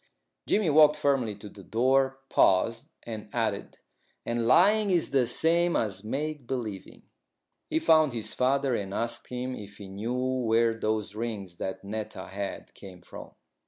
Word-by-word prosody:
Jimmy 200 -7 +2
walked 150 0 +6
firmly 135 -7 0
to 105 +1 -11
the 100 -1 -13
door, 130 +5 +2
paused, 115 +6 +2 0.2
and 110 -2 -7
added, 110 -4 -2 0.5
"And 115 -1 -1
lying 205 - +5
is 175 -6 +1
the 130 -3 +2
same 170 +6 +2
as 95 -3 -1
make 145 +3 -4
believing." 110 -7 -5 0.7
He 315 - 0
found 160 - +4
his 115 -3 -3
father, 135 +1 +1
and 100 -3 -3
asked 115 0 -2
him 125 +1 -4
if 100 -1 -10
he 100 - -9
knew 105 +6 -4
where 120 -3 +1
those 110 -2 -2
rings 105 -6 -5
that 95 - -5
Netta 105 +2 -6
had 100 0 -6
came 90 -3 -12
from. - - -11
115 Hz, 155 wpm, -28 LUFS, 105-135 Hz, 0.7 s, walked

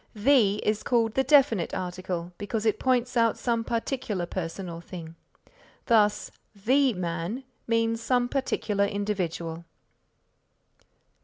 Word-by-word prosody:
The 215 -2 +4
is 215 0 +1
called 230 -3 +1
the 265 - +2
definite 255 - +3
article 180 -1 -4
because 215 +2 -3
it 215 -1 +2
points 250 -1 +1
out 230 -2 +3
some 230 -2 0
particular 225 -5 -2
person 180 +1 -5
or 170 -1 -7
thing; 165 -2 -9 0.7
thus, 210 -3 +3 0.2
the 255 +6 +3
man 175 +7 -3 0.2
means 230 0 +1
some 245 +1 +1
particular 215 -6 0
individual. 180 -5 -3
215 Hz, 115 wpm, -27 LUFS, 180-235 Hz, 0.7 s, The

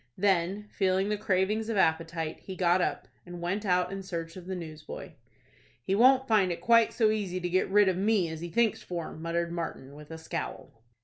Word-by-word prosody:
Then, 195 +1 +1
feeling 190 0 +1
the 210 - +1
cravings 210 +2 0
of 225 - -1
appetite, 165 -2 0
he 190 - -8
got 180 0 +3
up, - - -2 0.2
and 175 -1 -9
went 190 +5 -2
out 180 0 +2
in 195 0 -5
search 165 -3 -5
of 185 -1 -10
the 190 - -3
newsboy. 155 -3 -8 0.7
"He 190 - -1
won't 260 +5 +5
find 205 -5 +3
it 170 - -3
quite 230 -1 +4
so 220 -3 +2
easy 195 -4 -2
to 180 - -2
get 185 +1 +1
rid 205 +1 +5
of 185 -1 +1
me 200 -2 +2
as 160 0 -6
he 170 - -5
thinks 225 +4 +1
for," 170 -2 -5
muttered 170 +1 -2
Martin, 165 -5 -5
with 150 0 -12
a 160 - -7
scowl. 160 +1 -6
185 Hz, 205 wpm, -29 LUFS, 170-205 Hz, 0.7 s, won't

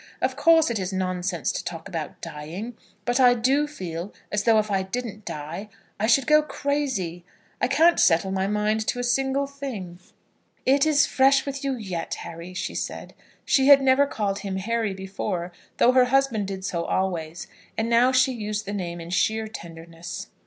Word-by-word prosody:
Of 260 0 0
course 320 -1 +4
it 225 - -1
is 185 0 -3
nonsense 185 -3 -1
to - - -4
talk 165 -2 -6
about 165 -4 -6
dying, 175 +11 -7 0.3
but 245 +2 +1
I 250 -1 +6
do 270 +5 +2
feel 180 - -6 0.2
as 210 0 -1
though 225 -2 +5
if 215 -1 +1
I 195 -1 +2
didn't 210 +1 -5
die 160 +8 -6 0.3
I 215 - +1
should 245 +3 +4
go 305 +2 +5
crazy. 265 - -2 0.4
I - - +3
can't 325 +6 +4
settle 170 +3 +3
my 190 0 0
mind 210 +1 0
to - - 0
a 245 - -2
single 270 +3 +1
thing." 255 -11 -7 0.7
"It 275 +3 +4
is 285 -2 +4
fresh 270 0 +3
with 280 0 -5
you 275 -1 0
yet, 190 -8 -4
Harry," 170 +2 -9
she - - -3
said. - - -5 0.3
She 270 -1 +3
had 280 -1 +9
never 270 +1 +4
called 200 -5 -2
him 195 -1 -4
Harry 215 +1 -1
before, 190 -2 -4 0.3
though 245 - +5
her 255 -1 +5
husband 250 -5 +1
did 190 -1 -5
so 170 -3 -2
always, 175 -3 -2 0.3
and 220 - 0
now 235 +2 +4
she 260 +1 +4
used 215 -2 -4
the 200 - -4
name 175 -4 -4
in 170 +1 -8
sheer 220 +4 +1
tenderness. 165 -4 -9
215 Hz, 185 wpm, -25 LUFS, 185-265 Hz, 0.7 s, had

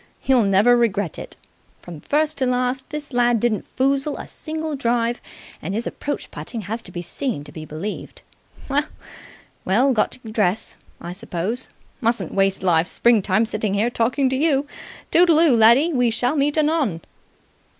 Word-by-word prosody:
You'll 255 -5 +3
never 200 +5 +4
regret 205 -7 0
it! - - -10 0.5
From 170 -4 -10
first 305 0 0
to 260 - +1
last 250 +1 -1
this 295 -2 -7
lad 240 -1 +3
didn't 225 -2 -1
foozle 275 +2 0
a - - -7
single 315 -1 -5
drive, 240 -2 0 0.4
and 190 +6 -4
his 225 +2 -2
approach 290 - -5
putting 230 - -6
has 220 +4 -4
to 180 - -12
be 175 0 -5
seen 195 - -3
to 145 - -12
be 155 +1 -8
believed. 160 +8 -7 1.4
Well, 250 +8 +3
got 215 - +1
to 225 -3 -10
dress, 210 -1 0 0.2
I 175 - -7
suppose. 205 +4 -4 0.3
Mustn't 235 0 0
waste 195 -1 +1
life's 170 -2 +2
springtime 215 -2 +2
sitting 215 -3 -2
here 220 +4 +1
talking 250 +4 +1
to - - +1
you. 285 0 +2 0.5
Toodle 340 -2 +5
oo, 320 -7 +5
laddie! 235 +9 +5
We 245 -3 +2
shall 245 +5 0
meet 290 +1 +1
anon!" 300 - +1
235 Hz, 160 wpm, -21 LUFS, 200-275 Hz, 1.4 s, Toodle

